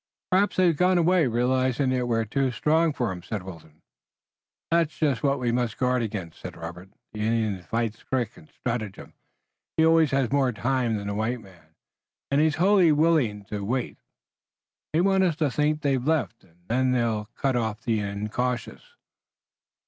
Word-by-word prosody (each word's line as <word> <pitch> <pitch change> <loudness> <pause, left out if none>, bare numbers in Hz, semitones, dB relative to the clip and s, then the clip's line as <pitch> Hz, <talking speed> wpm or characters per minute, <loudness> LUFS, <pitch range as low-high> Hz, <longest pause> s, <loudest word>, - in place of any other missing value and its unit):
"Perhaps 195 +2 +3
they've 180 -3 +3
gone 180 +3 +3
away, 175 -2 +3
realizing 130 +2 +1
that 125 -1 0
we're 115 -1 +1
too 135 +4 0
strong 160 +6 +2
for 120 -7 -2
'em," 90 -1 -6
said 100 +2 -5
Wilton. 80 -4 -12 0.9
"That's 165 -2 +1
just 140 -8 +1
what 140 -1 +1
we 120 -2 0
must 120 -2 -1
guard 125 -1 +1
against," 100 -7 -5
said - - -8
Robert. 85 +3 -8 0.2
"The 105 - -7
Indian 110 -3 0
fights 115 +3 -2
with - - -25
trick 120 -4 -1
and 160 -3 -17
stratagem. 115 -7 -5 0.6
He 160 - +5
always 160 -2 +5
has 135 -3 0
more 135 -2 +2
time 120 0 0
than 100 - -6
the 100 - -2
white 110 +4 -1
man, 85 -6 -19 0.6
and 140 +1 +3
he 155 - +5
is 150 - 0
wholly 180 0 +4
willing 145 -10 +2
to 100 0 -5
wait. 120 +4 -2 0.9
They 160 - +2
want 190 0 +3
us 175 -4 +2
to 150 -4 0
think 150 +2 0
they've 135 -3 +1
left, 145 - -1
and 85 -3 -26
then 130 +2 +1
they'll 115 -4 0
cut 135 -2 0
off 110 -1 -2
the 115 -2 0
incautious." 120 - -3
125 Hz, 180 wpm, -26 LUFS, 110-150 Hz, 0.9 s, He